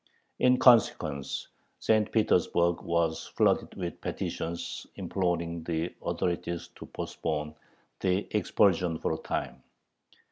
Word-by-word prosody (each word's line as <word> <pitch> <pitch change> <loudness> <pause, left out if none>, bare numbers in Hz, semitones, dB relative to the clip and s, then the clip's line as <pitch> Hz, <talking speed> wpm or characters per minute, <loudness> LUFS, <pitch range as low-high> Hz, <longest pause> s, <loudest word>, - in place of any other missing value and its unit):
In 125 0 +5
consequence, 115 - +3 0.3
St. 110 -1 +2
Petersburg 85 -5 +2
was 85 -1 0
flooded - - +2
with - - -5
petitions 85 +1 -4
imploring 85 -3 -1
the 80 0 -2
authorities 85 -1 -2
to - - -11
postpone 75 -1 -3 0.5
the 95 +2 +1
expulsion 90 -5 +3
for 80 - -1
a - - -2
time. 65 +1 -4
85 Hz, 105 wpm, -29 LUFS, 80-100 Hz, 0.5 s, In